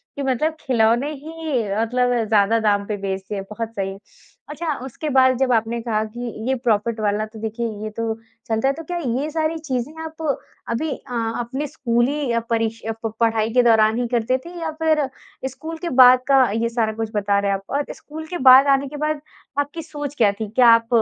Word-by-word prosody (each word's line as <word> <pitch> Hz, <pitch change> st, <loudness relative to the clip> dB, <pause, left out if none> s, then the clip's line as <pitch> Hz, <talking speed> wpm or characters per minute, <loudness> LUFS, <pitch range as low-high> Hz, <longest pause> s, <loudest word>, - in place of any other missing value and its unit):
कि 280 Hz, -, -3 dB
मतलब 275 Hz, +5 st, 0 dB
खिलौने 240 Hz, +2 st, +2 dB
ही 305 Hz, -3 st, -3 dB, 0.2 s
मतलब 245 Hz, +2 st, +1 dB
ज़्यादा 215 Hz, +1 st, +3 dB
दाम 205 Hz, -2 st, +1 dB
पे 210 Hz, -, -2 dB
बेच 195 Hz, -1 st, -2 dB
दिए 205 Hz, -2 st, -3 dB
बहुत 225 Hz, +1 st, -4 dB
सही। 195 Hz, -1 st, -3 dB, 0.5 s
अच्छा 310 Hz, +1 st, -2 dB
उसके 295 Hz, +4 st, -5 dB
बाद 260 Hz, -2 st, +4 dB
जब 265 Hz, -1 st, +1 dB
आपने 230 Hz, +1 st, 0 dB
कहा 220 Hz, -2 st, 0 dB
कि 235 Hz, +3 st, -9 dB, 0.3 s
ये 265 Hz, -, +2 dB
प्रॉफ़िट 225 Hz, -1 st, +1 dB
वाला 210 Hz, 0 st, 0 dB
तो 220 Hz, 0 st, -12 dB
देखिए 225 Hz, +2 st, -3 dB, 0.2 s
ये 215 Hz, -, -3 dB
तो 230 Hz, -1 st, -1 dB, 0.3 s
चलता 225 Hz, +3 st, +1 dB
है। 275 Hz, -, +2 dB
तो 325 Hz, +3 st, -8 dB
क्या 350 Hz, +3 st, -4 dB, 0.2 s
ये 300 Hz, -, -2 dB
सारी 320 Hz, 0 st, -1 dB
चीज़ें 265 Hz, -1 st, -3 dB
आप 320 Hz, 0 st, -8 dB, 0.5 s
अभी 235 Hz, +8 st, -1 dB
अ, 265 Hz, -2 st, -7 dB, 0.3 s
अपने 265 Hz, +5 st, -3 dB
स्कूली 250 Hz, -1 st, 0 dB
परीक्ष 225 Hz, -1 st, -1 dB, 0.2 s
प 225 Hz, -, -1 dB
पढ़ाई 225 Hz, -1 st, +2 dB
के 250 Hz, -, +5 dB
दौरान 220 Hz, -1 st, +4 dB
ही 245 Hz, -, 0 dB
करते 240 Hz, +2 st, +1 dB
थे 340 Hz, -, -7 dB
या 320 Hz, -1 st, -2 dB
फ़िर 310 Hz, -3 st, +3 dB, 0.4 s
स्कूल 315 Hz, +5 st, -7 dB
के 345 Hz, +1 st, -4 dB
बाद 250 Hz, 0 st, +9 dB
का 270 Hz, -1 st, +6 dB
ये 225 Hz, +2 st, 0 dB
सारा 225 Hz, -2 st, 0 dB
कुछ 225 Hz, 0 st, -3 dB
बता 200 Hz, 0 st, +2 dB
रहे 200 Hz, 0 st, 0 dB
हैं 195 Hz, -, +1 dB
आप? 195 Hz, -, -16 dB
और 285 Hz, +1 st, -1 dB
स्कूल 315 Hz, +1 st, -9 dB
के 350 Hz, +1 st, -4 dB
बाद 265 Hz, +2 st, +9 dB
आने 275 Hz, 0 st, +3 dB
के 295 Hz, -, -8 dB
बाद 305 Hz, 0 st, -1 dB, 0.4 s
आपकी 290 Hz, +3 st, -2 dB
सोच 290 Hz, -2 st, -6 dB
क्या 215 Hz, -6 st, +4 dB
थी? 205 Hz, +1 st, -6 dB
क्या 245 Hz, +2 st, +4 dB
आप 230 Hz, 0 st, +5 dB
240 Hz, 205 wpm, -21 LUFS, 220-290 Hz, 0.5 s, बाद